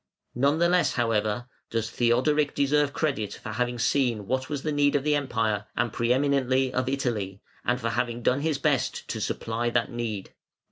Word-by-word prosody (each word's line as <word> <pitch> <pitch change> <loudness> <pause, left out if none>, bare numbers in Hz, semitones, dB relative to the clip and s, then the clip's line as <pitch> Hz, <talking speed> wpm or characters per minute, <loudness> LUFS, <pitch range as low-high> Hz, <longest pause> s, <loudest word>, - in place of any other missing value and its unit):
None 140 +5 +2
the 170 +1 +4
less, 175 -6 +3
however, 115 -1 0 0.2
does 115 -1 -2
Theodoric 135 +5 +2
deserve 145 +1 +2
credit 135 -10 -1
for - - -8
having 125 0 -1
seen 120 -3 +1
what 130 +4 -1
was 145 -3 -3
the 155 - -1
need 145 -1 +2
of 140 0 +1
Europe, 115 -8 0
and 120 -3 0
pre 120 +1 0
eminently 130 -1 +2
of 130 0 0
Italy, 110 -8 -2 0.2
and 125 +1 +1
for 115 -1 -1
having 120 +1 -2
done 130 +4 +2
his 155 -1 0
best 140 -2 0
to - - -3
supply 115 +1 -1
that 120 - 0
need. 115 -5 -4
125 Hz, 180 wpm, -26 LUFS, 115-140 Hz, 0.2 s, the